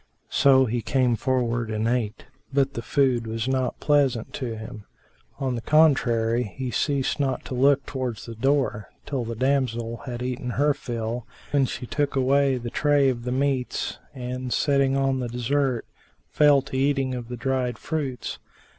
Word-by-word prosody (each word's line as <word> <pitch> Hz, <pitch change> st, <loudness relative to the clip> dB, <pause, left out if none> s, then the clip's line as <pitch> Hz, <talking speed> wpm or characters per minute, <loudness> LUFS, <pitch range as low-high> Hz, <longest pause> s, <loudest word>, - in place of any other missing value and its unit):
So 130 Hz, -1 st, +5 dB
he 120 Hz, 0 st, -1 dB
came 125 Hz, -1 st, +2 dB
forward 120 Hz, -1 st, 0 dB
and 110 Hz, +1 st, -1 dB
ate; 115 Hz, -2 st, -1 dB, 0.3 s
but 140 Hz, 0 st, +1 dB
the 115 Hz, -, -4 dB
food 125 Hz, -4 st, +1 dB
was 110 Hz, +1 st, -3 dB
not 130 Hz, -1 st, -1 dB
pleasant 140 Hz, -6 st, +1 dB
to 120 Hz, -5 st, -4 dB
him; 110 Hz, -1 st, -9 dB, 0.5 s
on 135 Hz, -2 st, -1 dB
the 120 Hz, -, -3 dB
contrary 120 Hz, -6 st, +3 dB
he 130 Hz, -2 st, -3 dB
ceased 140 Hz, +2 st, 0 dB
not 135 Hz, -3 st, -1 dB
to -, -, -6 dB
look 135 Hz, +2 st, +3 dB
towards 130 Hz, -5 st, -4 dB
the 115 Hz, -, -7 dB
door, 130 Hz, -3 st, 0 dB, 0.2 s
till 135 Hz, -4 st, -2 dB
the 115 Hz, 0 st, -4 dB
damsel 120 Hz, -2 st, 0 dB
had 120 Hz, 0 st, -4 dB
eaten 125 Hz, 0 st, -3 dB
her 145 Hz, +1 st, +4 dB
fill, 115 Hz, -2 st, -4 dB, 0.2 s
when 140 Hz, -2 st, +3 dB
she 125 Hz, -, -5 dB
took 145 Hz, +3 st, -1 dB
away 135 Hz, 0 st, +3 dB
the 120 Hz, -1 st, -5 dB
tray 145 Hz, -2 st, +3 dB
of 120 Hz, -2 st, -3 dB
the 125 Hz, -, -2 dB
meats 130 Hz, -1 st, -1 dB, 0.2 s
and, 125 Hz, 0 st, -4 dB
setting 140 Hz, -1 st, +2 dB
on 135 Hz, -1 st, +1 dB
the 125 Hz, -, -2 dB
dessert, 125 Hz, +1 st, 0 dB, 0.5 s
fell 145 Hz, -3 st, +5 dB
to 135 Hz, -, -7 dB
eating 135 Hz, -1 st, +1 dB
of 120 Hz, -2 st, -5 dB
the 125 Hz, 0 st, -6 dB
dried 130 Hz, 0 st, -1 dB
fruits. 150 Hz, -5 st, -4 dB
130 Hz, 170 wpm, -25 LUFS, 120-140 Hz, 0.5 s, So